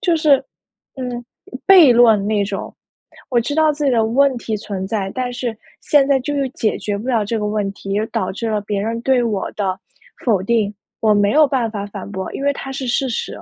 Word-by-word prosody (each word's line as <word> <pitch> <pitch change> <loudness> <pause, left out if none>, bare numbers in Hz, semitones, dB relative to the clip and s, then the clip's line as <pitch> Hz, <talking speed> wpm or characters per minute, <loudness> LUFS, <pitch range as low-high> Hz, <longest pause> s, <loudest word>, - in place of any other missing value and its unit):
就 345 -3 +2
是， 300 -4 +3 0.5
嗯， 245 -2 -5 0.4
悖 355 -10 +8
论 225 -4 +5
那 210 -1 +1
种。 200 0 -5 0.6
我 245 - +3
知 285 +5 -3
道 315 -1 +3
自 295 0 -4
己 275 - +3
的 225 -2 +2
问 270 +4 +3
题 220 -2 -3
存 200 -2 -5
在， 195 -2 -2
但 255 -1 -2
是 240 -2 -4 0.2
现 285 -2 +3
在 275 -1 +3
就 290 +3 -3
是 275 -2 0
解 220 -4 -1
决 205 -1 -3
不 240 +5 -6
了 225 -4 +1
这 225 +2 -2
个 210 - -2
问 210 -1 -1
题， 200 +1 -4
导 185 - -1
致 225 +4 -4
了 210 -1 0
别 200 -1 -2
人 230 +2 -2
对 260 -2 +2
我 210 -5 -2
的 190 -2 -2 0.5
否 210 -7 +2
定。 215 -1 +1 0.3
我 215 -1 +3
没 205 0 +3
有 305 0 +6
办 250 -4 -1
法 205 -2 -5
反 200 -1 -8
驳， 190 -1 -5
因 275 - -5
为 285 - +3
它 270 - -7
是 265 -1 -4
事 255 +2 0
实。 235 - -3
230 Hz, 240 characters per minute, -19 LUFS, 205-265 Hz, 0.6 s, 悖